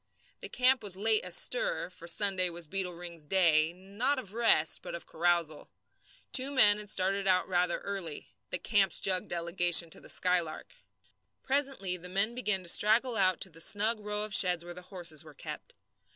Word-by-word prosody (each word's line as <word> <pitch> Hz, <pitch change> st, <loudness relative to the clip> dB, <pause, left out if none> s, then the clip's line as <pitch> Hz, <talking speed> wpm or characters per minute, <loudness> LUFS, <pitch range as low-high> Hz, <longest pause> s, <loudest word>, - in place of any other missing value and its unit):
The -, -, -7 dB
camp 255 Hz, 0 st, +2 dB
was 200 Hz, -4 st, -2 dB
late 215 Hz, +1 st, +2 dB
astir, -, -, +1 dB
for 170 Hz, -2 st, -12 dB
Sunday 185 Hz, 0 st, +1 dB
was 170 Hz, 0 st, -5 dB
Beetle 180 Hz, +2 st, -3 dB
Ring's 170 Hz, -3 st, -8 dB
day 160 Hz, -3 st, +2 dB
not 200 Hz, +10 st, -3 dB
of 210 Hz, -6 st, -6 dB
rest, 225 Hz, -9 st, +2 dB
but -, -, -7 dB
of 170 Hz, -, -9 dB
carousal. 170 Hz, -2 st, -1 dB, 0.6 s
Two 265 Hz, +1 st, +6 dB
men 210 Hz, -7 st, +4 dB
had 210 Hz, -1 st, -8 dB
started 195 Hz, +1 st, -1 dB
out 185 Hz, -1 st, +2 dB
rather 180 Hz, -1 st, 0 dB
early 195 Hz, -6 st, -7 dB, 0.2 s
the -, -, -1 dB
camp's 200 Hz, -3 st, 0 dB
jug 185 Hz, -2 st, 0 dB
delegation 170 Hz, -1 st, +2 dB
to -, -, -2 dB
the -, -, -14 dB
Skylark. 175 Hz, -4 st, -1 dB, 0.7 s
Presently 265 Hz, -10 st, 0 dB
the 180 Hz, +1 st, -11 dB
men 200 Hz, +5 st, -1 dB
began 210 Hz, -6 st, -2 dB
to 170 Hz, -, -1 dB
straggle 225 Hz, +6 st, +3 dB
out 185 Hz, -4 st, +1 dB
to 190 Hz, -, -2 dB
the 165 Hz, +1 st, -10 dB
snug 215 Hz, +5 st, +1 dB
row 210 Hz, 0 st, -4 dB
of 215 Hz, -1 st, -6 dB
sheds 180 Hz, -4 st, +4 dB
where 175 Hz, -, -8 dB
the 180 Hz, -, -11 dB
horses 175 Hz, -5 st, -3 dB
were 155 Hz, -2 st, -16 dB
kept. -, -, -9 dB
185 Hz, 180 wpm, -29 LUFS, 175-210 Hz, 0.7 s, Two